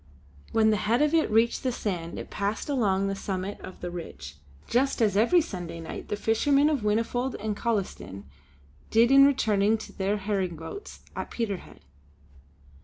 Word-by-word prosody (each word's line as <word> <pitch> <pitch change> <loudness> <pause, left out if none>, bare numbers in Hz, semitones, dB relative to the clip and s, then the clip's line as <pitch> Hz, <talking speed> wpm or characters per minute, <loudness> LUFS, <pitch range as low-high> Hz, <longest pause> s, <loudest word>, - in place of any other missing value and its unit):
When 220 -1 +4
the 210 - +2
head 225 +8 +2
of 300 +1 +1
it 325 -1 +3
reached 225 +2 +3
the 255 - 0
sand, 180 -8 -4
it - - -7
passed 205 +7 -2
along 200 -8 +1
the 195 - -1
summit 195 0 -4
of 185 - -10
the 175 - -4
ridge, 70 - -8 0.3
just 265 +3 +1
as 210 -4 +2
every 240 - +5
Sunday 175 - -6
night 165 - -7
the - - -2
fishermen 275 +8 +3
of 290 - +1
Whinnyfold 230 +4 0
and 215 0 -2
Collieston 190 - -3 0.7
did 230 +3 +4
in 275 0 +8
returning 220 -5 +2
to - - -10
their 200 +1 0
herring 195 -3 -1
boats 165 - -9
at - - -4
Peterhead. 210 -6 -4
210 Hz, 170 wpm, -27 LUFS, 190-240 Hz, 0.7 s, in